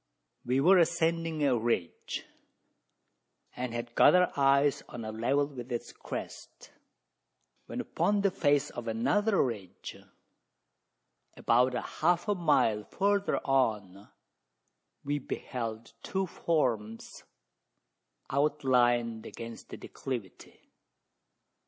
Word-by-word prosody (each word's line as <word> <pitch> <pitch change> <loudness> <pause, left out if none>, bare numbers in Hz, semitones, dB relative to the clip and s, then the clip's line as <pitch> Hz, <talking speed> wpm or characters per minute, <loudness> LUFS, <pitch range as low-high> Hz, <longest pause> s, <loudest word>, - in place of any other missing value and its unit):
We 125 +2 +1
were 180 +6 +6
ascending 165 -2 +1
a 135 -3 +3
ridge, 115 -7 -2 1.3
and 125 -1 -4
had 120 0 -5
got - - +6
our 180 0 +4
eyes 140 0 +3
on 115 -2 -7
a 110 - -4
level 130 +6 +1
with 130 -3 -9
its 120 - -4
crest, - - -8 1.0
when - - -5
upon 205 0 0
the 200 -1 +2
face 145 -6 +1
of 120 -1 -7
another 145 - +2
ridge 100 -7 -6 1.4
about 125 +2 +3
half 175 +8 0
a 205 - +3
mile 115 - +2
further 200 - 0
on 105 -7 0 1.0
we 145 +1 -1
beheld 115 -4 -5
two 190 0 -2
forms 120 - -2 1.1
outlined 125 -5 +1
against 115 0 -9
the - - -8
declivity. 120 -9 -8
130 Hz, 100 wpm, -30 LUFS, 115-160 Hz, 1.4 s, were